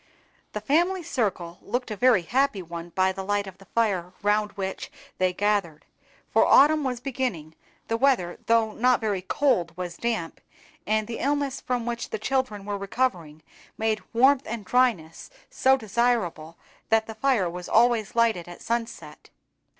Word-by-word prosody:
The 210 Hz, -, -4 dB
family 345 Hz, -, +1 dB
circle 185 Hz, -, -2 dB
looked 245 Hz, -1 st, -3 dB
a -, -, -2 dB
very 240 Hz, -4 st, +4 dB
happy 245 Hz, -1 st, 0 dB
one 170 Hz, 0 st, -8 dB
by 185 Hz, +2 st, +1 dB
the 190 Hz, 0 st, -6 dB
light 205 Hz, +1 st, 0 dB
of 190 Hz, -1 st, -11 dB
the 195 Hz, -, -16 dB
fire 190 Hz, -6 st, -1 dB
round 210 Hz, 0 st, +1 dB
which 190 Hz, -1 st, -5 dB, 0.3 s
they 185 Hz, 0 st, +2 dB
gathered; 195 Hz, -5 st, -1 dB, 0.5 s
for -, -, +5 dB
autumn 300 Hz, +2 st, +5 dB
was 250 Hz, -3 st, -2 dB
beginning, 240 Hz, -, -3 dB, 0.3 s
the 225 Hz, -, 0 dB
weather, 235 Hz, -9 st, +1 dB
though 225 Hz, -1 st, +3 dB
not 250 Hz, +3 st, +2 dB
very 210 Hz, -4 st, -1 dB
cold, 185 Hz, -, 0 dB
was 175 Hz, -2 st, -5 dB
damp; 225 Hz, -9 st, -3 dB, 0.5 s
and 215 Hz, 0 st, +1 dB
the 230 Hz, +1 st, -6 dB
illness 280 Hz, -1 st, -1 dB
from 245 Hz, -2 st, -2 dB
which 235 Hz, 0 st, -4 dB
the -, -, -3 dB
children 220 Hz, -4 st, -2 dB
were 205 Hz, -1 st, -3 dB
recovering 185 Hz, -8 st, -2 dB, 0.3 s
made 220 Hz, -1 st, 0 dB
warmth 260 Hz, +3 st, +4 dB
and 220 Hz, -2 st, -5 dB
dryness 225 Hz, -11 st, 0 dB, 0.2 s
so 265 Hz, 0 st, +3 dB
desirable, 215 Hz, -8 st, -1 dB, 0.3 s
that 225 Hz, 0 st, +3 dB
the 220 Hz, -, -7 dB
fire 220 Hz, -4 st, +1 dB
was 175 Hz, +1 st, -7 dB
always 230 Hz, -2 st, +3 dB
lighted 225 Hz, -7 st, +2 dB
at 175 Hz, -, -11 dB
sunset. 235 Hz, 0 st, -5 dB
220 Hz, 160 wpm, -25 LUFS, 185-245 Hz, 0.5 s, for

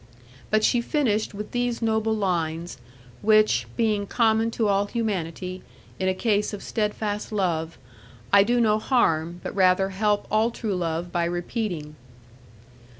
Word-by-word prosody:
But 215 Hz, 0 st, +2 dB
she 240 Hz, -, +3 dB
finished 225 Hz, -6 st, 0 dB
with 210 Hz, +1 st, -6 dB
these 245 Hz, -1 st, -1 dB
noble 220 Hz, -1 st, +1 dB
lines, 170 Hz, -6 st, -2 dB, 0.4 s
which 215 Hz, 0 st, +3 dB
(being 215 Hz, -3 st, +1 dB
common 225 Hz, -1 st, +2 dB
to 225 Hz, -1 st, 0 dB
all 200 Hz, 0 st, +2 dB
humanity, 185 Hz, -5 st, -3 dB, 0.4 s
in 190 Hz, -, 0 dB
a -, -, +2 dB
case 210 Hz, 0 st, 0 dB
of 205 Hz, -, -6 dB
steadfast 210 Hz, -1 st, -2 dB
love) 170 Hz, -5 st, -1 dB, 0.6 s
I 200 Hz, -, +8 dB
do 240 Hz, +4 st, +2 dB
no 215 Hz, -2 st, +3 dB
harm, 175 Hz, -, +1 dB
but -, -, -5 dB
rather 190 Hz, 0 st, +3 dB
help 205 Hz, +1 st, 0 dB
all 215 Hz, +2 st, +3 dB
true 220 Hz, -4 st, -3 dB
love 170 Hz, 0 st, -2 dB
by 170 Hz, -1 st, 0 dB
repeating. 175 Hz, -3 st, -3 dB
205 Hz, 145 wpm, -25 LUFS, 180-220 Hz, 0.6 s, I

